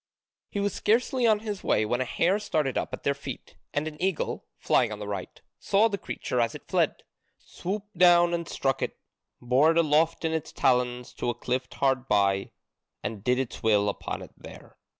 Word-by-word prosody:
He 205 - -3
was 200 -1 0
scarcely 245 +2 +2
on 215 -2 +3
his 210 -3 -5
way 110 - +2
when 120 +4 0
a - - 0
hare 180 - +1
started 155 -10 -1
up - - -2
at - - -6
their 140 - +2
feet, 140 - -8 0.2
and 145 +2 -1
an 155 0 -8
eagle, 190 -3 -1
flying 120 -4 +2
on 105 - -4
the 105 0 -6
right, 100 -3 -5 0.2
saw 205 +3 +3
the 200 -2 -3
creature 125 - -2
as 115 - 0
it - - -11
fled, - - 0 0.3
swooped 205 +2 -6
down 175 -1 +6
and 170 -1 -2
struck 135 -1 -1
it, - - -3 0.4
bore 130 +6 +3
it 165 - +2
aloft 160 +1 +2
in 160 - +1
its 160 -2 -3
talons 125 -1 +1
to 120 - -2
a 120 - -1
cliff 125 +2 -2
hard 135 -1 +1
by, 100 -1 +2 0.5
and 105 -3 -5
did 125 +1 +2
its 130 -2 -3
will 105 -2 +3
upon 100 - -5
it - - -12
there. - - -13
140 Hz, 200 wpm, -27 LUFS, 120-180 Hz, 0.5 s, down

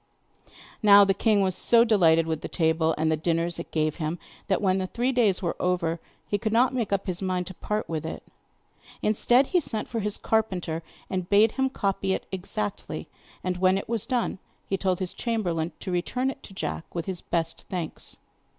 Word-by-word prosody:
Now 205 -2 +8
the 195 - +3
king 210 +1 +2
was 190 -1 +2
so 230 +5 +5
delighted 165 -7 +4
with 160 -2 -2
the - - -4
table, 160 -1 +1
and 160 +1 +1
the - - +3
dinners 165 +2 -1
it 170 - -6
gave 155 -1 0
him, 160 0 -2 0.3
that 195 - +2
when 190 -2 +2
the 185 - -2
three 245 +6 0
days 215 -7 +2
were 170 - -1
over 175 -2 0 0.3
he 205 - 0
could 220 0 -1
not 245 +4 +4
make 235 -5 -1
up 200 -1 0
his 185 -1 -3
mind 185 -1 -1
to 185 - -6
part 210 +4 -3
with 160 -2 -3
it. 160 - -6 0.8
Instead, 240 +5 +4
he 360 - +6
sent 225 -9 -3
for 230 - -3
his 210 -1 -1
carpenter, 185 -7 0 0.3
and 185 -1 -3
bade 210 +2 +5
him 265 0 0
copy 195 -5 -1
it - - -6
exactly, 180 - -4 0.3
and 180 -1 -1
when 185 +1 +3
it 195 - -4
was 230 -3 -2
done 245 -6 -1 0.3
he 195 - -1
told 190 -1 0
his 185 -1 -4
chamberlain 175 -8 -1
to 185 - -4
return 250 +9 0
it - - -12
to - - -12
Jack 170 - -5
with 170 -1 -2
his 185 -3 -4
best 165 -1 -2
thanks. 175 -4 -5
190 Hz, 205 wpm, -26 LUFS, 170-215 Hz, 0.8 s, Now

